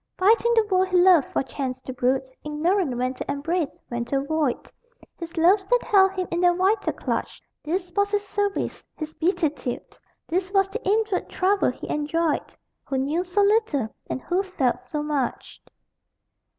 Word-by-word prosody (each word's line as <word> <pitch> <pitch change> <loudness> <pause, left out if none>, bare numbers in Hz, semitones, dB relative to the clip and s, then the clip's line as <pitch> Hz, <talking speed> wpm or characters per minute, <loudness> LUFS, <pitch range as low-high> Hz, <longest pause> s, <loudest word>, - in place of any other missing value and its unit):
Fighting 450 +5 +4
the 450 -1 +4
world 375 -2 +2
he 370 -1 +2
loved 355 -5 +6
for - - -1
chance 260 0 -4
to 260 - -7
brood, 260 +1 0 0.2
Ignorant 300 -1 0
when 255 +1 0
to 265 - -5
embrace, 300 +2 -1 0.2
when 240 -1 -2
to 275 - -1
avoid 280 -1 -1 0.5
His 335 -1 -8
loves 380 +4 +4
that - - +2
held 385 -2 +4
him 370 -1 -2
in 340 +1 0
their 355 -1 +4
vital 385 +5 +1
clutch - - -3 0.2
This 355 +3 -3
was 405 0 +2
his 410 0 -1
service, 405 0 -2
his 310 -1 -6
beatitude; 315 -8 -2 0.3
This 370 +2 -1
was 390 -1 +3
the 460 +5 -6
inward 425 -2 +1
trouble 390 +2 +2
he - - -7
enjoyed 305 +1 -1 0.3
Who 270 - -2
knew 295 +7 0
so 365 +3 0
little, 400 - +2 0.2
and - - -2
who 360 +2 +1
felt 330 -11 -1
so 300 -1 -2
much. 290 -4 -3
350 Hz, 170 wpm, -24 LUFS, 285-390 Hz, 0.5 s, loved